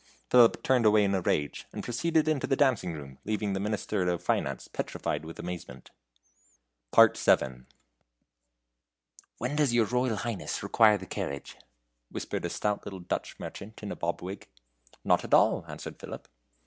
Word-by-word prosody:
Philip 120 -2 +6
turned 125 -4 +4
away 105 0 +5
in 100 0 +1
a 95 - +1
rage, 75 -4 -1
and - - -6
proceeded 155 +6 +1
into 155 -4 +1
the 135 - +2
dancing 130 -11 +2
room, 70 -4 -9
leaving 105 -2 -1
the 95 - -1
Minister 105 -2 -1
of 85 -2 -2
Finance - - -1
petrified - - -3
with 80 +1 -9
amazement. 90 -7 -7 1.1
VII. 65 -1 +4 1.7
"When 125 +5 -2
does 145 -5 +2
your 115 -2 +4
Royal 125 +1 0
Highness 115 0 -3
require 110 -2 +5
the 95 - -9
carriage?" 70 -5 -5 0.5
whispered - - -4
a - - -1
stout 105 -1 -1
little 95 -2 -7
Dutch 90 - -4
merchant 110 +2 -9
in 105 - -4
a - - -4
bob 85 +1 -3
wig. 95 +3 -7 0.6
"Not - - +3
at - - +3
all," - - +3
answered - - -8
Philip. - - -8
105 Hz, 160 wpm, -29 LUFS, 90-120 Hz, 1.7 s, Philip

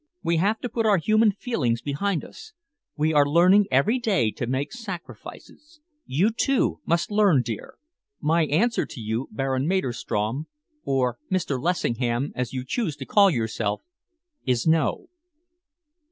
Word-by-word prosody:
We 170 0 +1
have 205 +6 +1
to - - -2
put 225 0 0
our 205 -2 +5
human 215 +5 +3
feelings 150 - -1
behind 160 +5 -1
us. - - -13 0.4
We 155 +1 +1
are 145 -1 +6
learning 180 +7 +4
every 140 - +2
day 190 - +1
to 120 - -5
make 135 +3 -2
sacrifices. 240 - -10 0.3
You, 175 - +2
too, 265 +3 +1
must 170 +4 0
learn, 200 -11 +4
dear. 115 -3 -6 0.4
My 165 +1 +2
answer 225 +12 +1
to 135 - -10
you, 110 +3 -3
Baron 135 +4 -1
Maderstrom 130 - -1 0.4
or 125 -3 0
Mr. 155 -8 -1
Lessingham, 125 -6 -1
as 125 -1 -3
you 130 -1 -4
choose 170 - -2
to 140 -2 -8
call 200 +5 +5
yourself 110 - -2 0.6
is 125 -2 0
no." 160 -2 +1
155 Hz, 145 wpm, -24 LUFS, 125-200 Hz, 0.6 s, are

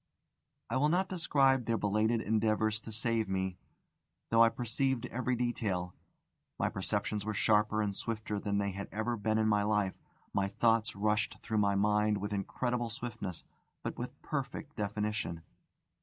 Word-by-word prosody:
I - - +2
will 145 +3 +3
not 185 +3 +2
describe 135 -8 +3
their 115 0 +1
belated 110 +3 +2
endeavours 110 0 +1
to 110 - -8
save 115 -1 0
me, 95 -1 -1 0.7
though 115 0 +7
I 115 - +6
perceived 125 +2 -1
every 125 +1 0
detail. 105 -7 -1 0.6
My - - +1
perceptions 105 +2 -1
were 110 0 -2
sharper 105 0 +3
and 100 -1 -2
swifter 110 -2 -3
than 100 0 -1
they 100 0 0
had 100 +1 -5
ever 110 +4 -1
been 110 0 0
in 110 0 +3
life; 105 -2 +2 0.4
my 100 0 +2
thoughts 115 +1 +2
rushed 105 +1 +1
through 110 -1 0
my 100 -1 +3
mind 105 +1 +3
with 105 +1 -3
incredible 120 +4 -1
swiftness, 115 -7 -5 0.4
but - - -4
with - - -6
perfect - - -4
definition. 105 -4 -2
110 Hz, 155 wpm, -32 LUFS, 100-115 Hz, 0.7 s, though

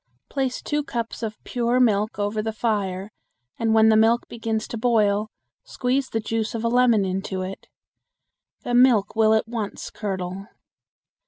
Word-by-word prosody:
Place 265 -2 -2
two 295 0 0
cups 235 -5 -4
of 215 -2 -4
pure 240 0 0
milk 215 -3 +2
over 205 +1 -1
the 220 +1 -2
fire 205 -3 -2 0.5
and 225 -1 +1
when 220 0 +5
the 220 - +5
milk 225 +2 +3
begins 225 -1 -3
to 235 - -4
boil 215 -3 +2 0.3
squeeze 260 +1 -1
the 225 - -1
juice 225 +1 -2
of 225 - -3
a 230 - +1
lemon 235 -4 +4
into 190 0 -3
it. 190 +1 -7 1.0
The 245 - -3
milk 240 -5 +4
will 220 0 +4
at 220 - 0
once 225 -3 -5
curdle. 190 -1 -4
220 Hz, 160 wpm, -23 LUFS, 205-235 Hz, 1.0 s, when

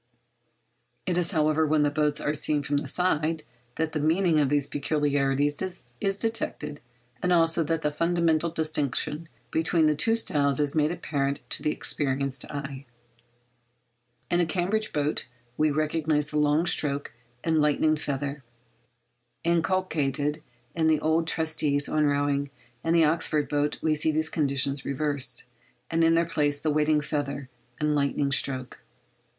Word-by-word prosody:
It 180 - 0
is, 175 -1 +1
however, 155 -2 +2
when 150 0 +3
the 145 - +1
boats 150 0 +1
are 150 - -1
seen 150 0 +1
from 145 +1 0
the 145 - -3
side 160 -3 0 0.3
that 160 0 -1
the 155 - -2
meaning 160 +2 +2
of 145 -3 +2
these 145 -1 +1
peculiarities 145 -1 0 0.5
is 195 0 +1
detected, 175 -9 -2 0.4
and 180 - 0
also 165 -1 +3
that 165 +1 -1
the 150 - +1
fundamental 170 0 +1
distinction 155 0 -1 0.2
between 165 0 +2
the 155 - +4
two 225 +10 +2
styles 140 - +1
is 145 -1 +1
made 155 0 +2
apparent 140 -5 -3
to - - -1
the - - 0
experienced 135 -3 0
eye. 140 -2 -6 1.4
In 175 - +3
the 175 - +2
Cambridge 195 +6 -1
boat 150 -2 -1 0.3
we 155 +3 +2
recognise 155 0 0
the 150 - 0
long 150 +3 +2
stroke 145 -6 +1 0.3
and 160 -2 +2
'lightning 150 +1 +2
feather' 140 -1 -4 1.0
inculcated 160 -4 0 0.3
in 160 -1 +1
the 155 -1 +3
old 160 +1 +1
treatises 155 -3 +2
on 155 -1 +1
rowing: 140 0 0 0.3
in 165 - 0
the 165 -1 +5
Oxford 155 -1 +1
boat 145 0 0
we 155 - +2
see 155 +1 +2
these 155 0 0
conditions 140 -2 0
reversed, 140 -3 -2 0.5
and 165 0 +2
in 165 0 +4
their 170 +1 +3
place 145 -3 0
the 155 - 0
'waiting 150 0 +2
feather' 140 -3 -3 0.3
and 150 0 +1
lightning 140 -1 0
stroke. 130 -1 0
150 Hz, 150 wpm, -26 LUFS, 145-160 Hz, 1.4 s, the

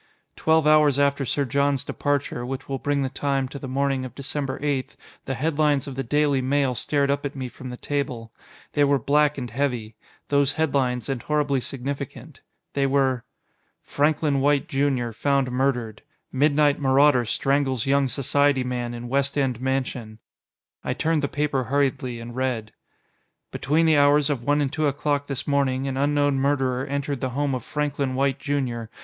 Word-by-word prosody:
Twelve 160 -1 +2
hours 150 -2 +5
after 140 -1 +2
Sir 140 +3 0
John's 140 +1 +1
departure 145 -4 -2
which 130 +2 -5
will 135 -1 -3
bring 145 -1 0
the 135 - -1
time, 135 -1 -1
to 140 - -7
the 135 - -6
morning 135 0 0
of 130 - -8
December 140 -1 -3
8 140 -3 -2 0.3
the 135 - -2
headlines 150 0 +1
of 140 - -6
the 135 - -3
Daily 145 +1 +1
Mail 135 0 +1
stared 140 +3 0
up 140 0 -1
at 145 0 -4
me 130 -2 -4
from 130 +1 -9
the 125 - -7
table. 125 -6 -3 0.4
They 145 - +3
were 140 0 +4
black 145 +4 +2
and 125 -4 -5
heavy: 120 -4 -2 0.4
those 140 -1 +3
headlines, 135 -6 0
and 135 -3 -2
horribly 145 -3 0
significant. 135 +1 -6 0.3
They 140 -1 +1
were: 135 -3 +1 0.6
FRANKLIN 145 -1 +1
WHITE 145 0 +2
Jr. 135 -4 0
FOUND 135 +2 0
MURDERED 125 -4 -1 0.3
Midnight 145 +1 +3
Marauder 135 -1 +4
Strangles 135 +1 0
Young 140 0 +3
Society 140 +1 +2
Man 120 -1 -3
in 120 +1 -7
West 140 +3 0
End 130 -4 0
Mansion 130 -4 -2 0.7
I - - -2
turned 160 -1 +1
the 140 - 0
paper 140 -3 -1
hurriedly, 130 -2 0
and 120 +1 -8
read: 125 -4 -2 0.8
Between 155 +4 +1
the 160 -2 +4
hours 145 +1 +4
of 135 -5 -2
one 145 +4 +1
and 140 0 -1
two 155 -1 +1
o'clock 145 0 -1
this 140 -2 -3
morning, 135 -2 +1
an 135 - -2
unknown 145 0 +2
murderer 135 -1 0
entered 140 -1 -3
the 130 - -1
home 145 -1 0
of 130 - -3
Franklin 145 -3 -2
White, 135 0 +1
Jr. 130 -5 -2
140 Hz, 175 wpm, -24 LUFS, 130-145 Hz, 0.8 s, hours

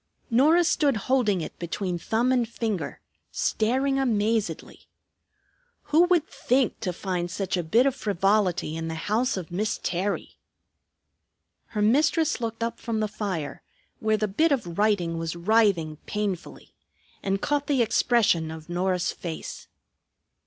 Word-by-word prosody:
Norah 305 +9 +5
stood 290 -6 +2
holding 210 -5 +1
it - - -7
between 175 +1 -3
thumb 230 +8 +1
and 245 -3 +1
finger, 220 -6 -3 0.3
staring 265 +5 +1
amazedly. 215 - -1 1.1
Who 335 +3 +7
would 350 -3 +2
think 255 -1 0
to 180 - -2
find 175 -1 -3
such 190 +1 -2
a 180 - 0
bit 225 +10 +3
of 275 - +2
frivolity 195 - +1
in 165 0 -4
the 160 - -4
house 215 +8 0
of 175 -3 -6
Miss 205 +5 -1
Terry! 190 +3 -2 1.3
Her 210 -2 -2
mistress 300 +5 +2
looked 230 0 -3
up 230 - -3
from 230 -2 -2
the 215 - +1
fire, 190 -8 -4 0.4
where 220 0 +1
the 215 0 0
bit 315 +12 +2
of 200 -12 -1
writing 180 -6 +1
was 165 0 -3
writhing 175 -5 +2
painfully, 205 -4 -4 0.5
and 195 0 0
caught 290 +5 -1
the 270 -5 +3
expression 220 -8 +2
of 160 0 -9
Norah's 180 0 0
face. 165 -3 -7
210 Hz, 140 wpm, -26 LUFS, 175-240 Hz, 1.3 s, Who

